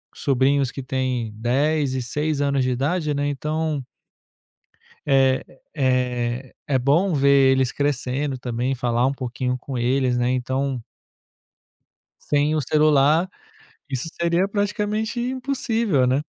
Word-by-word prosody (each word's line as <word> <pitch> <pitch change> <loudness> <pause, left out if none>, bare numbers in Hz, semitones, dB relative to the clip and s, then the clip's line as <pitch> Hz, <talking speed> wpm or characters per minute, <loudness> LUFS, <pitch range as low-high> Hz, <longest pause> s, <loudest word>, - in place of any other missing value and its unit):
sobrinhos 135 0 +1
que 135 - -6
têm 130 -3 -2
10 135 +5 +1
e 130 - -1
6 150 +4 -2
anos 140 -2 +1
de 130 - 0
idade, 150 +5 0
né, 145 0 -1
então 150 0 -2 1.2
é 135 -2 +3 0.3
é 125 -2 -1
é 135 -2 +2
bom 165 +9 +2
ver 140 -2 +5
eles 130 -2 +2
crescendo 140 -1 -1
também, 125 +1 -2
falar 120 0 +1
um 135 - +1
pouquinho 125 -1 -3
com 130 0 -6
eles, 125 +1 +1
né, 120 +1 +1
então 130 0 -1 1.4
sem 150 +1 +1
o 155 - +1
celular, 155 +4 +3 0.6
isso 130 +3 -3
seria 170 +2 +2
praticamente 210 +2 -1
impossível, 240 - 0
né. 135 +4 +1
135 Hz, 125 wpm, -22 LUFS, 130-155 Hz, 1.4 s, ver